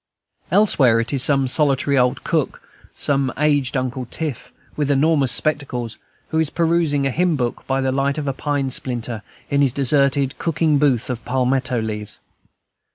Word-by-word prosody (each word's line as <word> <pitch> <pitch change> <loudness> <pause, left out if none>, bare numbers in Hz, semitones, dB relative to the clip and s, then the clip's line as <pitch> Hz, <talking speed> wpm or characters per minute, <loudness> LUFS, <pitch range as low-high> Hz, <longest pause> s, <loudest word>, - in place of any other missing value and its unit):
Elsewhere, 150 - +4
it 115 +4 -2
is 135 - +3
some 135 -1 +3
solitary 140 0 +2
old 125 -1 +1
cook, - - -1 0.4
some 140 -2 0
aged 145 -2 +1
Uncle 130 -1 -3
Tiff, 155 -7 -5 0.2
with 145 -2 -1
enormous 145 -1 +3
spectacles, 130 -7 -1 0.3
who 160 - 0
is 160 -2 +1
perusing 165 -4 +1
a 135 - +1
hymn 175 +3 +1
book 120 -4 -3
by 135 0 0
the 130 0 0
light 140 +2 0
of 150 -2 -3
a 135 - 0
pine 140 -1 -2
splinter, 120 -3 -3 0.3
in 140 0 +2
his 135 -3 +3
deserted 140 0 +1
cooking 160 -2 +1
booth 135 -6 +2
of 120 -2 -5
palmetto 130 0 0
leaves. 105 -2 -5
135 Hz, 160 wpm, -20 LUFS, 125-150 Hz, 0.4 s, Elsewhere